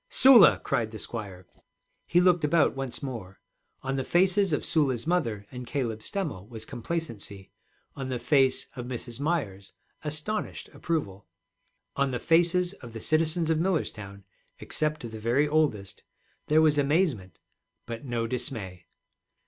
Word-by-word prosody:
'Sula!' 260 -4 +7
cried 115 -3 0
the 110 - -8
squire. 100 -6 -7 0.6
He 175 - +4
looked 180 -2 +4
about 150 0 +3
once 135 -1 -5
more. 110 -8 -6 0.4
On 135 +1 -2
the 130 - -1
faces 190 +4 +3
of 150 - 0
Sula's 135 -7 +1
mother 115 - 0
and 125 -1 -7
Caleb 120 -6 -2
Stemmel 115 - -4
was 110 -2 -7
complacency, 115 - -5 0.4
on 135 -1 -5
the 130 - -1
face 135 0 +2
of 125 -2 -6
Mrs. 120 -1 -6
Myers 140 - -2 0.3
astonished 155 +8 -3
approval, 100 - -3 0.7
on 140 0 +1
the 125 - -2
faces 175 +5 +3
of 120 - -12
the 115 - -6
citizens 160 +4 +1
of 160 - +2
Millerstown 105 - -2 0.3
except 155 0 -2
the 110 -2 -7
very 120 +7 +2
oldest 145 -11 0 0.5
there 155 +1 +5
was 150 -2 +4
amazement, 140 - +1 0.5
but 115 +1 -6
no 120 -4 -2
dismay. 110 -7 -5
135 Hz, 140 wpm, -27 LUFS, 110-160 Hz, 0.7 s, Sula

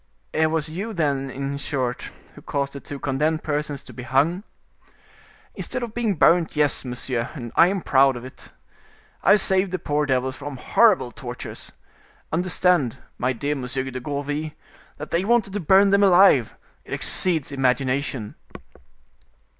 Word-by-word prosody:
"It 160 0 +2
was 160 -1 -1
you, 195 +8 -5
then, 140 -6 -1
in 140 +1 -4
short, 130 -4 -3 0.2
who - - -14
caused 140 -1 -3
the 140 - -6
two 145 - -8
condemned 150 +4 -1
persons 145 -2 -3
to - - -13
be 125 - -8
hung?" 140 +8 +1 1.1
"Instead 255 -1 -4
of 230 -2 -6
being 230 -4 0
burnt, 170 0 +3
yes, 150 -2 +2
monsieur, 125 -1 -3
and 120 -5 -7
I 170 - +7
am 190 -1 -2
proud 135 -1 +4
of 120 0 -8
it. 130 - -13 0.7
I 195 - +6
saved 190 -2 +2
the 185 - -1
poor 150 -3 -1
devils 130 0 0
from 145 -1 -7
horrible 190 - +3
tortures. 125 -1 -8 0.6
Understand, 175 -6 +1 0.2
my 125 +1 +1
dear 140 +4 -2
Monsieur 130 -1 -3
de 130 - -5
Gourville, 145 +3 -4 0.4
that 150 - -8
they 170 +2 +1
wanted 220 -2 +1
to 205 - -2
burn 195 +3 +4
them 200 0 +4
alive. 180 - +5 0.3
It - - -8
exceeds 160 -7 0
imagination!" 130 -3 -1
145 Hz, 155 wpm, -23 LUFS, 130-180 Hz, 1.1 s, I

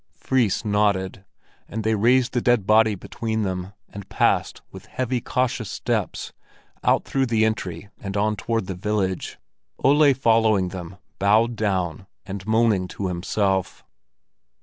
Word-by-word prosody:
Fris 120 -5 0
nodded, 100 -2 0 0.4
and 110 +1 -4
they 110 +1 +1
raised 125 +4 +3
the 120 - +1
dead 120 -5 +2
body 110 0 +4
between 110 +3 -3
them, 95 -1 -3 0.2
and 100 -1 -10
passed - - +1
with - - -12
heavy, 125 -1 -2
cautious 125 -4 -1
steps - - -3 0.5
out - - +2
through 135 -1 0
the 110 -2 +2
entry 105 -3 -3
and 100 0 -5
on 105 +1 +1
toward 115 0 -2
the 95 - -4
village, 95 0 -2 0.5
Ole 145 +1 +5
following 110 -6 +3
them, 90 -1 -8 0.2
bowed 110 +4 +3
down 95 -4 -2 0.2
and 100 0 -7
moaning 110 -4 +2
to 95 +1 -4
himself. 95 +2 -1
105 Hz, 140 wpm, -23 LUFS, 95-115 Hz, 0.5 s, Ole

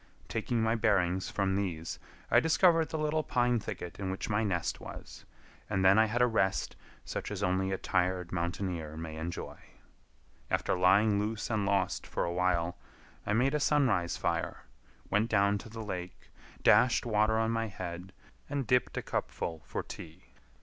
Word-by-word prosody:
Taking 115 +1 -1
my 110 0 +2
bearings 95 -5 +1
from 95 -2 0
these, 85 -5 -3 0.3
I - - +7
discovered 165 0 +4
the 160 - -3
little 155 0 +1
pine 125 -4 +1
thicket 100 -5 -7
in 95 -2 -2
which 95 +3 -3
my 105 +2 +2
nest 90 -5 -1
was, - - -10 0.4
and 95 -2 +1
then 95 +3 +7
I 110 - +6
had 120 +3 +2
a - - +7
rest 100 -5 0 0.3
such - - -4
as 105 -1 -4
only 95 +1 +1
a 95 - 0
tired 90 -1 0
mountaineer 85 -3 -3
may 80 -1 -6
enjoy. 85 +2 -5 0.9
After - - +1
lying 100 +3 +4
loose 110 +2 -2
and 105 -3 0
lost 95 -2 0
for - - -2
awhile, 85 -1 0 0.5
I 105 - +1
made 130 +5 +2
a 150 - +1
sunrise 125 - +2
fire, - - -2 0.5
went 105 +3 +2
down 100 -1 +3
to 110 - -10
the 110 0 -7
lake, 90 -3 -7 0.3
dashed 125 -1 +5
water 110 -1 +2
on 110 0 +1
my 115 0 0
head, 90 -2 -7 0.4
and 140 -2 -1
dipped 125 +3 +1
a - - -2
cupful 80 -2 -3
for - - -3
tea. 80 +4 -11
100 Hz, 170 wpm, -31 LUFS, 90-115 Hz, 0.9 s, I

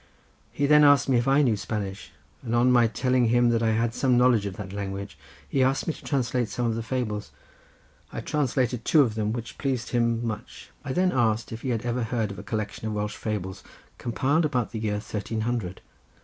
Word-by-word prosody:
He 140 +5 0
then 150 +1 +6
asked 145 -3 +6
me 130 - +4
if 120 - -2
I 140 +2 +4
knew 120 -5 +3
Spanish, 100 -2 -5 0.3
and 120 -1 -2
on 125 +2 +4
my 120 -2 +5
telling 125 +2 +1
him 120 +1 +3
that 115 -1 +2
I 110 -1 +2
had 115 +1 0
some 125 -1 +2
knowledge 120 -4 +4
of 95 - -6
that 95 -2 -7
language 100 0 -5 0.3
he 135 - 0
asked 135 +1 +2
me 165 - 0
to - - -14
translate 125 -4 0
some 120 - -2
of 115 - +1
the 115 - -3
fables. 115 -3 -3 0.8
I - - -5
translated 130 -5 0
two 150 +3 +5
of 115 -5 -1
them, 110 -1 -1
which 115 0 -6
pleased 130 -4 -2
him 115 -1 +1
much. 110 -2 -6
I 135 - -4
then 180 +5 +2
asked 115 -4 +1
if 115 0 -6
he 130 - -3
had 115 -1 -1
ever 120 +1 -1
heard 115 -2 -1
of 100 - -8
a - - -8
collection 110 -2 -4
of 110 - -2
Welsh 105 0 -2
fables 95 -4 -4 0.4
compiled 140 +7 +1
about 130 -7 0
the 110 - -4
year 105 -1 -1
thirteen 110 +1 -4
hundred. 110 -6 -3
120 Hz, 220 wpm, -26 LUFS, 110-130 Hz, 0.8 s, then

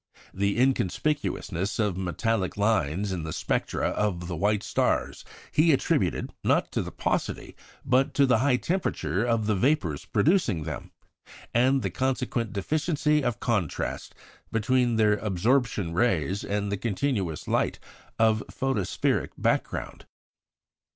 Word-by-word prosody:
The 100 +2 0
inconspicuousness 110 - 0
of 105 -4 +1
metallic 95 +2 -1
lines 100 -3 +1
in 90 -2 -2
the 80 0 -5
spectra - - -1
of 90 -5 -1
the 90 - -3
white 105 +5 +1
stars 100 - 0 0.3
he 160 +2 +4
attributed, 135 - +1
not - - +2
to - - 0
the - - -6
paucity, - - -2 0.3
but 130 +1 +2
to 140 - +5
the 125 -4 +3
high 135 +1 +3
temperature 105 - -1
of 115 -3 +1
the 105 - +2
vapours 95 - +1
producing 135 - +2
them, 75 -3 -6 0.6
and 130 +2 +3
the 95 - -1
consequent 125 0 -1
deficiency 150 - 0
of 120 -4 -1
contrast 105 - -2 0.4
between 120 +2 +2
their 105 -1 +3
absorption 105 -2 0
rays 95 - +1
and 100 0 -2
the 100 - -1
continuous 100 - -2
light - - +1 0.4
of 110 -1 +4
the - - -8
photospheric 130 -8 -1
background. - - -2
110 Hz, 130 wpm, -27 LUFS, 95-130 Hz, 0.6 s, to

